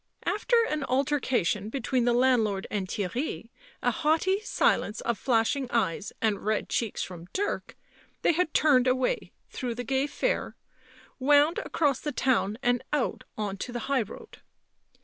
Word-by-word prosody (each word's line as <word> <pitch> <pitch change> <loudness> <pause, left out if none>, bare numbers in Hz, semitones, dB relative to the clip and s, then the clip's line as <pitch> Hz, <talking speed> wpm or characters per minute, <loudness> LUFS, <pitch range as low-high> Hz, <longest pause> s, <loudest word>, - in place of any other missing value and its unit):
After 465 +4 +2
an 305 -1 -2
alter 280 +3 +1
cation 210 -5 0
between 255 0 0
the 240 - +3
landlord 235 -6 +2
and 200 -3 -2
Theirry, 230 - -3 0.3
a - - +3
haughty 325 +6 +1
silence 225 - +1
of 235 - 0
flashing 245 +4 +1
eyes 210 -4 0
and 215 -3 +1
red 215 0 0
cheeks 230 -4 -1
from 175 -2 -9
Dirk, 405 +2 -2 0.5
they - - +5
had 345 0 0
turned 265 -6 +4
away 255 - 0 0.2
through 245 -2 -3
the 245 - -4
gay 265 +3 0
fair, - - -1 0.6
wound 290 +4 +4
across 285 -5 0
the 295 - -3
town 230 -7 +1
and 245 0 +2
out 295 -4 -1
on 205 -2 -3
to 245 - -5
the 240 -1 -4
high 275 -2 +2
road. 210 - -9
250 Hz, 155 wpm, -28 LUFS, 220-290 Hz, 0.6 s, they